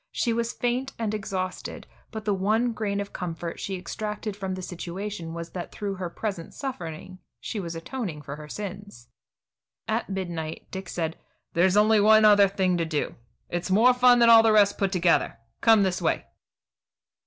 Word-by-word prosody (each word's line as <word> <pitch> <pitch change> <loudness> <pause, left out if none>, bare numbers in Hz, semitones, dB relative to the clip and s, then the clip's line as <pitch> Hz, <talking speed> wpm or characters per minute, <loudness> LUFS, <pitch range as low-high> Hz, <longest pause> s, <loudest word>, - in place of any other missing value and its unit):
She 235 - 0
was 235 0 -1
faint 245 +3 -2
and 220 -2 -2
exhausted, 195 -3 -4 0.2
but 220 -2 -7
the 210 - +2
one 215 +5 +1
grain 205 -2 -2
of 200 0 -5
comfort 170 -1 -5
she 195 -1 -3
extracted 210 +2 -5
from 190 -2 -4
the 185 - -7
situation 180 0 -5
was 170 0 -6
that 175 -2 -6
through 205 -1 -4
her 185 -2 -4
present 185 -2 -5
suffering 185 - -6 0.2
she 220 - -4
was 170 -3 -5
atoning 165 - -5
for 140 0 -6
her 150 0 -10
sins. 200 - -8 0.8
At - - -1
midnight 170 -5 -4
Dick 190 -1 -6
said: 165 -2 -3 0.3
"There's 185 +3 +3
only 215 +1 +5
one 215 +1 +6
other 205 -1 +7
thing 185 -2 0
to 165 - +1
do. 155 -2 -2 0.3
It's 175 +2 -3
more 225 +7 +5
fun 250 0 +6
than 235 -1 +6
all 225 -1 +10
the 225 0 +4
rest 205 -2 +4
put 195 -1 +1
together. 180 -3 +2 0.2
Come 225 -3 +6
this 185 -1 0
way." 165 - 0
195 Hz, 175 wpm, -26 LUFS, 175-215 Hz, 0.8 s, all